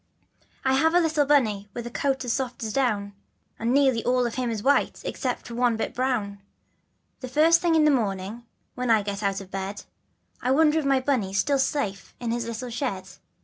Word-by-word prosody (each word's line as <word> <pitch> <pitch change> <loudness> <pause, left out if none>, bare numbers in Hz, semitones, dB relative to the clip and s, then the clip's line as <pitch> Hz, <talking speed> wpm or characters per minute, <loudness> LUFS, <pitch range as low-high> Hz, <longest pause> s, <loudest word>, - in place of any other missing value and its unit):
T 265 0 +3
HAVE 320 +5 +3
a - - +7
little 315 -4 +1
Bunny 215 -8 +2
with 240 - -5
a 240 - -6
coat 265 0 -1
as 235 - 0
soft 255 -3 -3
as 215 -1 -3
down, 210 -7 0 0.5
And 230 +2 0
nearly 265 -4 +3
all 250 0 +2
of 235 - -2
him 250 -2 -2
is 220 -3 -3
white 285 +1 +2
except 250 -2 -3
one 240 -1 +1
bit - - -2
of - - -21
brown. 225 -6 -1 0.8
The 255 - -6
first 315 +6 +4
thing 340 -2 +2
in 310 -1 +4
the 300 - +5
morning 210 -2 -2 0.3
when 250 -1 -3
I 220 -2 +4
get 200 0 -4
out 195 -2 0
of 190 -1 -13
bed, 195 +1 -5 0.6
I 250 - -1
wonder 305 +3 +4
if 305 - -3
my 275 -1 +3
Bunny's 225 -8 0
still 280 +6 +2
safe 240 -8 -2
in 235 -2 -3
his 235 0 -2
little 235 +2 -5
shed. 195 -6 -3
245 Hz, 210 wpm, -25 LUFS, 210-275 Hz, 0.8 s, a